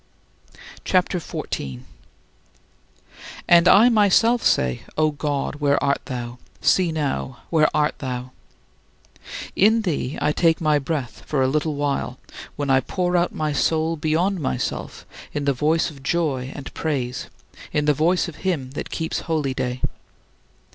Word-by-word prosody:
'" - - -17
CHAPTER 180 -1 +1
XIV - - -5
15. 65 -2 -5 1.6
And 170 0 +6
I 210 +6 +7
myself 225 +2 +4
say: 65 -1 +2 0.2
"O 155 0 +3
my - - -15
God, 145 -1 -2
where 145 -1 +2
art 140 0 +1
thou? 120 -1 -6 0.2
See 180 -3 +3
now, 140 -5 -3
where 155 -2 +4
art 150 0 0
thou?" 125 -1 -4 1.2
In 220 +3 +4
thee 155 -6 -2
I 150 - +2
take 165 +1 +2
my 155 -2 +2
breath 140 -3 -4
for 135 -3 +1
a - - +3
little 155 +2 0
while, 145 -1 -2 0.4
when 145 -2 -1
I 130 - +5
pour 180 +6 -1
out 175 0 +2
my 155 -1 -1
soul 160 +2 +1
beyond 165 +5 0
myself 130 -4 -3 0.3
in 145 -1 -2
the 140 - +3
voice 155 +5 +1
of 140 -3 -14
joy 135 -4 -1
and 140 - -8
praise, 130 -5 -2 0.4
in 150 0 0
the 150 - +4
voice 170 +6 +2
of 170 - -9
him 155 -9 -2
that 140 - -5
keeps 160 -1 -2
holyday. 130 -5 -2
150 Hz, 150 wpm, -22 LUFS, 135-170 Hz, 1.6 s, I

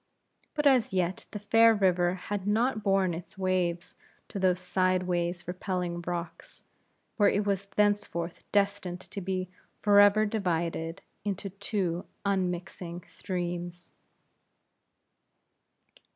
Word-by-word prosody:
But 295 -1 0
as 260 -5 +4
yet 185 0 -1
the - - -6
fair 225 +2 +5
river 180 -3 +2
had 195 +1 -4
not 220 +2 +2
borne 195 -3 +2
its 175 +5 -8
waves 185 -2 0 0.4
to 200 - -5
those 185 -1 +2
sideways 180 -1 0
repelling 180 -1 -3
rocks, 175 -1 -6 0.5
where 205 - +5
it 205 +1 0
was 200 -1 -1
thenceforth 205 -5 0
destined 200 -3 0
to 200 - -7
be 185 0 -2 0.4
forever 205 +1 +6
divided 170 -4 -2 0.2
into 200 -1 -3
two 195 -2 -2 0.2
unmixing 180 -2 -2
streams. 175 -1 -5
185 Hz, 110 wpm, -29 LUFS, 175-205 Hz, 0.5 s, forever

